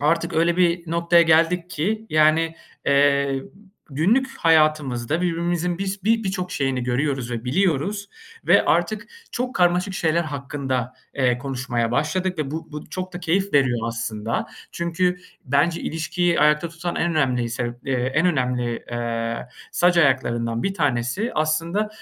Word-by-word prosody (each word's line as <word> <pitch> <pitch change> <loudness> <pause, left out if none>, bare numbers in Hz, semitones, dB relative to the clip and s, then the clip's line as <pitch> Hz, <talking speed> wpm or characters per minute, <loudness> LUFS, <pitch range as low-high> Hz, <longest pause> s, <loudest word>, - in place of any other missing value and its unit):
artık 165 +3 +1
öyle 170 +2 +2
bir 175 -2 +1
noktaya 170 0 +4
geldik 170 +2 +3
ki 215 +8 -2
yani, 155 +1 +3 0.3
eee, 140 -1 +3 0.5
günlük 195 - +2
hayatımızda 155 -4 +2
birbirimizin 175 0 -1
biz 195 0 -4
bi 225 +1 +2
birçok 185 -1 -3
şeyini 135 -2 -1
görüyoruz 125 0 -1
ve 120 -1 -4
biliyoruz. 190 +7 0 0.4
Ve - - +5
artık - - +1 0.3
çok 250 +1 -3
karmaşık 180 +2 +2
şeyler 170 -1 +1
hakkında, 135 -4 -3 0.2
eee, 125 -3 +1
konuşmaya 125 -3 -2
başladık 175 +8 -1
ve 145 -3 -2
bu 160 0 -6
bu 150 0 -7
çok 185 +2 -5
da 175 - -6
keyif 190 +4 0
veriyor 130 -4 +3
aslında. 115 -1 -3 0.3
Çünkü 175 +1 0 0.3
bence 145 +5 +1
ilişkiyi 170 +1 0
ayakta 150 +2 +3
tutan 170 +1 -5
en 175 - +1
önemli 130 -7 +1
sebep, 120 0 -4
eee, 135 - 0 0.2
en 160 +4 +3
önemli, 125 -7 -1
eee, 115 -1 -2 0.4
sac 175 0 +3
ayaklarından 120 -6 +1
1 195 - -1
tanesi 145 - 0
aslında 165 +7 0
155 Hz, 140 wpm, -23 LUFS, 130-175 Hz, 0.5 s, Ve